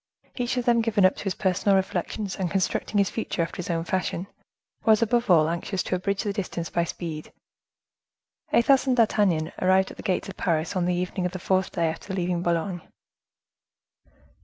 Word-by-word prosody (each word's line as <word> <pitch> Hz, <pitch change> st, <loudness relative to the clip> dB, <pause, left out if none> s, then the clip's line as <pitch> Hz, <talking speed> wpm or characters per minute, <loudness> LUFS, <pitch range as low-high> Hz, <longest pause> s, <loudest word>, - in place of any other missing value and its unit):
Each 245 Hz, 0 st, -1 dB
of 245 Hz, -, -1 dB
them 235 Hz, -1 st, +4 dB
given 210 Hz, -4 st, +3 dB
up 185 Hz, -, +4 dB
to -, -, -7 dB
his 195 Hz, -, -1 dB
personal 195 Hz, +1 st, +2 dB
reflections, 190 Hz, +1 st, -2 dB
and 185 Hz, -2 st, -2 dB
constructing 195 Hz, +2 st, -1 dB
his 200 Hz, -2 st, +2 dB
future 215 Hz, -6 st, -2 dB
after 165 Hz, -, -6 dB
his 180 Hz, -, -5 dB
own 165 Hz, -1 st, 0 dB
fashion, 185 Hz, 0 st, -2 dB, 0.6 s
was, 220 Hz, 0 st, +5 dB
above 235 Hz, 0 st, +1 dB
all, 160 Hz, -4 st, +6 dB
anxious 170 Hz, +3 st, -2 dB
to -, -, -1 dB
abridge 195 Hz, +2 st, -1 dB
the 205 Hz, -2 st, -2 dB
distance 180 Hz, -4 st, -4 dB
by 170 Hz, -, +1 dB
speed. 160 Hz, -2 st, -6 dB, 1.2 s
Athos 270 Hz, +3 st, +4 dB
and 255 Hz, -1 st, +2 dB
D'Artagnan 200 Hz, -8 st, +2 dB
arrived 190 Hz, +1 st, +3 dB
at -, -, -13 dB
the -, -, -7 dB
gates 190 Hz, -3 st, -1 dB
of 195 Hz, -, -9 dB
Paris 165 Hz, +1 st, 0 dB
on 180 Hz, -2 st, +1 dB
the 180 Hz, 0 st, +1 dB
evening 180 Hz, 0 st, -1 dB
of 180 Hz, -, -9 dB
the -, -, -3 dB
fourth 190 Hz, 0 st, 0 dB
day 170 Hz, -, +1 dB
after 165 Hz, +4 st, -4 dB
leaving 175 Hz, -2 st, -1 dB
Boulogne. 175 Hz, +1 st, -1 dB
185 Hz, 190 wpm, -25 LUFS, 175-205 Hz, 1.2 s, all